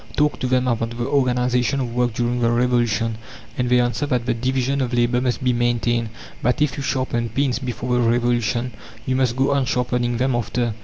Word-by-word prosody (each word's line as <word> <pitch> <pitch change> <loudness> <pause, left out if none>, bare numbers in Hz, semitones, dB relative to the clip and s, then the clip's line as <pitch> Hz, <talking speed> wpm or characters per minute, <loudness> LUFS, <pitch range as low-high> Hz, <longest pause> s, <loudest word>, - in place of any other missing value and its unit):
Talk 150 0 +1
to 130 - -1
them 125 0 +1
about 115 -1 -1
the 120 - -2
organization 125 0 +1
of 120 -3 -3
work 120 -2 0
during 120 +1 0
the 115 -1 +2
Revolution, 120 -2 +1 0.4
and 125 -1 -1
they 125 0 +4
answer 120 +4 0
that 125 -4 0
the 125 - +1
division 130 +3 0
of 125 -1 -1
labour 120 +1 +2
must 125 0 -1
be 125 -1 +2
maintained; 120 -1 0 0.3
that 125 - +1
if 150 -3 +1
you - - -4
sharpened 120 -4 -2
pins 135 -3 +1
before 125 -1 -3
the 125 - +2
Revolution 120 0 0 0.3
you 130 - 0
must 130 -2 +1
go 135 +2 +2
on 140 -2 +2
sharpening 125 -1 0
them 130 +1 +1
after. 120 0 -1
125 Hz, 205 wpm, -21 LUFS, 120-130 Hz, 0.4 s, they